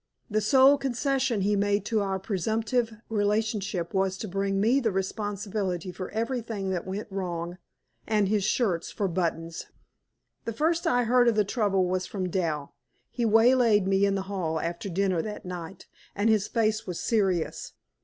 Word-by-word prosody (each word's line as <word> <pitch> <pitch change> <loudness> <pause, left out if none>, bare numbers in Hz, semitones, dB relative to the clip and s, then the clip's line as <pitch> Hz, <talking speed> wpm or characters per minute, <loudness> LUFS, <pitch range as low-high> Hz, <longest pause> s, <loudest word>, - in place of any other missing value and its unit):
The 215 +1 +2
sole 265 +6 +6
concession 265 -3 0
he 205 +2 +2
made 205 0 +1
to 220 -1 +1
our 195 -1 -1
presumptive 220 +5 -1 0.2
relationship 205 -4 -1
was 190 -1 +1
to 215 - -5
bring 195 +1 -1
me 235 +7 +3
the 235 -4 +1
responsibility 195 -2 -3
for 185 0 -6
everything 225 -3 -3
that 180 -1 -3
went 195 +3 -4
wrong, 175 -2 -4 0.5
and 210 -2 +2
his 205 0 +1
shirts 195 -6 0
for 200 - -2
buttons. 165 -2 -2 0.8
The 230 - -3
first 325 +7 +1
I 245 0 +3
heard 245 +1 +4
of 235 - +4
the 210 -1 +3
trouble 200 -3 +1
was 185 +1 -1
from 185 -3 -3
Dal. 160 -6 -2 0.4
He 240 - -1
waylaid 225 -2 +5
me 195 0 +2
in 195 - +1
the 195 - -2
hall 180 -5 -2
after 170 +4 -4
dinner 185 -1 +1
that 210 +2 -6
night, 180 0 -7 0.3
and 210 +3 +2
his 210 -2 +2
face 220 -1 0
was 180 -2 -4
serious. 195 -8 0
200 Hz, 165 wpm, -27 LUFS, 185-225 Hz, 0.8 s, sole